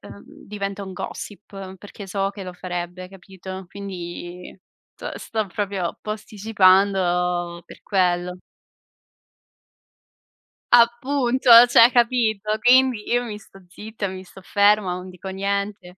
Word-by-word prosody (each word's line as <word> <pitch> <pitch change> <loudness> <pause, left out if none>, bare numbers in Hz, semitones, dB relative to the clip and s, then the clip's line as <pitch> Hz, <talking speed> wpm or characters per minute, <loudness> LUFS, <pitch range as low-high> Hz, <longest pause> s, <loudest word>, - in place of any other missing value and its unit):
ehm, 200 - -13 0.2
diventa 200 -1 -5
un 190 - -8
gossip 195 -1 -8
perché 205 0 -11
so 195 +1 -2
che 200 -1 -9
lo 180 - -7
farebbe, 180 0 -6
capito? 190 0 -10
Quindi 180 -2 -8 0.4
s - - -7
sto 220 -2 -3
proprio 190 -2 -3
posticipando 190 -5 +1
per - - -15
quello. 180 -2 0 2.4
Appunto, 245 +2 +3 0.2
cioè, 240 0 +6
capito? 220 -4 +1
Quindi 250 -2 +3
io 245 0 +1
mi 210 -3 -6
sto 195 -2 -17
zitta, 210 +2 -6
mi 185 0 -8
sto 190 - -15
ferma, 205 -1 +2
non 180 +1 -7
dico 185 +1 -11
niente, 195 -1 -4
195 Hz, 115 wpm, -22 LUFS, 185-215 Hz, 2.4 s, cioè